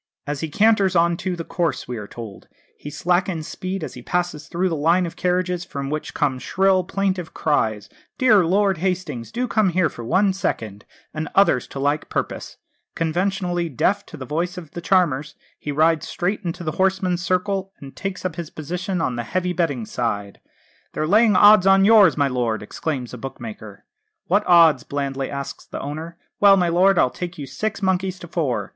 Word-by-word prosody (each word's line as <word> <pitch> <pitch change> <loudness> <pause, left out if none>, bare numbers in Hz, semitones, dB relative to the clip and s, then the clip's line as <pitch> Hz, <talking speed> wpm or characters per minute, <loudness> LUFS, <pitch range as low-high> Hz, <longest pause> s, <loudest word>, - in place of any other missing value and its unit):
"As 145 0 -3
he 160 - -3
canters 200 +1 +3
on 170 0 +3
to 185 0 -3
the 170 - -5
course," 170 -1 -2
we 125 - -4
are 105 -1 -7
told, 110 -4 -10 0.3
"he 145 - -9
slackens 175 0 0
speed 185 -1 -5
as - - -6
he 125 - -9
passes 175 +1 -2
through 180 +2 0
the 170 - -1
line 165 +5 +2
of 170 - -7
carriages, 180 -1 0
from 140 -5 -5
which 155 0 -4
come 140 -4 0
shrill, 190 +5 +2
plaintive 185 -2 -2
cries, 110 -9 0 0.3
'Dear 220 -7 +5
Lord 190 +1 +2
Hastings, 175 -10 -3
do 245 +2 -2
come 215 -4 +2
here 175 -1 +2
for 120 - -9
one 190 - +2
second,' 110 - -3 0.3
and 155 -1 -4
others 195 -10 +4
to 135 - -7
like 145 +2 0
purpose. - - -4 0.4
Conveniently 175 +1 -1
deaf 200 +9 +1
to 160 - -10
the 130 - -7
voice 170 +7 -2
of 165 -5 -9
the 175 - -7
charmers, 160 -5 +1 0.2
he 145 - -4
rides 160 +2 +2
straight 195 +4 -2
into 175 0 -4
the 155 - -2
horseman's 190 -2 +1
circle, 190 +2 -1
and 135 -1 -11
takes 195 -2 -5
up 175 -4 -3
his 170 -3 -5
position 180 +4 -4
on 125 -6 -1
the 120 - -2
heavy 180 +7 -1
betting 145 -9 -1
side. 100 -4 -3 0.5
'They're 155 - -1
laying 210 +4 +4
odds 205 0 +7
on 195 0 +6
yours, 210 -5 +6
my 140 -1 +3
lord,' 120 -4 -1
exclaims 130 +2 -4
a 125 - -7
bookmaker. 110 -5 -9 0.4
'What 200 +4 +2
odds?' 165 -6 +6
blandly 135 -1 -3
asks 140 -1 -6
the - - -6
owner. 160 +4 -6 0.2
'Well, 200 -1 +7
my 175 -2 +2
lord, 185 +3 +4
I'll 125 - +3
take 180 0 -6
you 145 - -5
six 205 +9 -4
monkeys 190 0 0
to 175 - -10
four!' 130 - -2
170 Hz, 190 wpm, -22 LUFS, 145-185 Hz, 0.5 s, odds